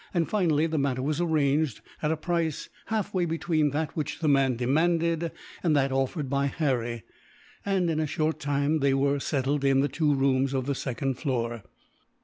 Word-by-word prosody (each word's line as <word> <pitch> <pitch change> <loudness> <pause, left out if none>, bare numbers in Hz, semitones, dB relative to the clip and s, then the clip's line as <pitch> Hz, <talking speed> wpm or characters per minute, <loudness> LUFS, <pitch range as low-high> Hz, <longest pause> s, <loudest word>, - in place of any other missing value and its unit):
Finally 165 -7 +2
the 160 -2 -1
matter 130 -2 0
was 150 +4 0
arranged, 150 -5 +1 0.2
at 150 - 0
a 160 - 0
price 165 -2 -2 0.2
halfway 205 -4 -1
between 160 -2 +1
that 150 +2 -3
which 155 - -3
the 155 - -1
man 135 -3 +3
demanded, 165 +6 +1 0.3
and 160 -4 +2
that 135 -1 +2
offered 135 +3 -1
by 140 +1 +1
Harry 120 -6 -1 0.6
and, 190 -3 +2
in 160 -2 0
a 155 - 0
short 155 0 -1
time, 145 +1 0
they 140 -1 +2
were 140 +1 +1
settled 140 0 -1
in 135 -1 +4
the 145 - +2
two 150 +1 +1
rooms 135 0 +1
of 130 -1 -1
the 140 - 0
second 135 -1 -3
floor. 120 -5 -2
145 Hz, 175 wpm, -27 LUFS, 135-160 Hz, 0.6 s, in